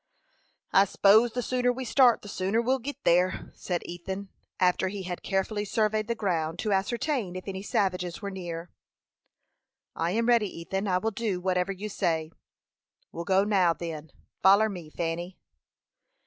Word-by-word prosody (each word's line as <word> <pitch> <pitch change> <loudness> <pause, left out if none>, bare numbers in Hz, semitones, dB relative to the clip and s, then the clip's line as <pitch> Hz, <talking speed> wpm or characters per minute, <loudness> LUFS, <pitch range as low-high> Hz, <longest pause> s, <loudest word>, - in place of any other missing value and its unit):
"I 195 - +7
s'pose 215 +4 +4
the 245 - -2
sooner 250 0 +1
we 255 +1 -5
start, 245 0 +4
the - - -9
sooner 195 +2 0
we'll 255 +3 +1
git 280 +4 -6
there," 180 +2 +2
said 175 -2 -3
Ethan, 190 +3 -6 0.3
after 180 +1 +3
he 195 0 -5
had 180 -1 -5
carefully 200 +2 -1
surveyed 215 +1 0
the 235 - -1
ground 165 -6 -1
to 210 +2 0
ascertain 220 - -1
if 185 - -7
any 190 -1 -4
savages 180 -3 -1
were 200 -2 -5
near. 175 -2 -6 1.2
"I 165 - 0
am 225 +5 0
ready, 235 -3 +4
Ethan. 195 +4 -3
I 180 -1 +2
will 220 +4 -1
do 205 -3 -2
whatever 180 +1 0
you 195 +2 -5
say." 165 -6 -1 0.8
"We'll 170 - -6
go 190 +1 +3
now, 190 -5 +3
then. 160 -2 -6 0.3
Foller 200 +3 +6
me, 175 -6 -8
Fanny." 170 +3 -4
195 Hz, 160 wpm, -28 LUFS, 180-215 Hz, 1.2 s, I